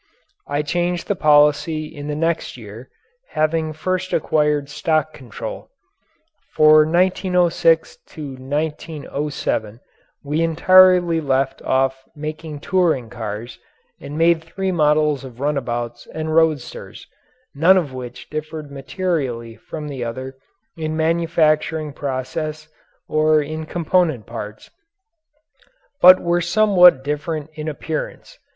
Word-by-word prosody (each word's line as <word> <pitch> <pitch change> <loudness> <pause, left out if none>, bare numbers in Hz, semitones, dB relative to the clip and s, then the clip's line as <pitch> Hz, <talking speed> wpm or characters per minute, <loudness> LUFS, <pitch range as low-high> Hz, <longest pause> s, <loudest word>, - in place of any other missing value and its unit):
I 145 +1 -1
changed 175 +3 -1
the 205 - 0
policy 150 0 +3
in 145 -1 -9
the 150 - -3
next 165 -3 -2
year 115 +2 -11 0.5
having 155 0 +1
first 185 +4 -3
acquired 150 -2 +1
stock 155 +1 -1
control. 125 -6 -8 0.9
For 155 0 +6
1906 180 - +2 0.2
1907 145 -4 -4 0.4
we 150 +3 -1
entirely 175 0 +5
left 135 -1 0
off 135 0 0
making 155 0 -6
touring 160 -12 +1
cars 110 +1 -6 0.4
and 145 +2 -8
made 165 0 +3
three 190 +3 -3
models 150 -3 +2
of 125 -2 -11
runabouts 120 -4 -3
and 155 0 -4
roadsters, 160 - -1 0.5
none 170 +7 +5
of 150 -8 -1
which 125 -2 -8
differed 155 -1 -6
materially 135 -6 -3
from 150 +4 -8
the 135 -4 -5
other 130 +3 -6 0.4
in 155 -1 -3
manufacturing 160 -2 +1
process 150 +3 -4 0.4
or 155 0 +3
in 155 +1 -5
component 165 - 0
parts, 105 -2 -8 1.3
but 185 +1 +9
were 175 0 0
somewhat 180 -5 +5
different 150 +1 -3
in 155 0 -6
appearance. 155 +1 -5
155 Hz, 110 wpm, -20 LUFS, 140-165 Hz, 1.3 s, but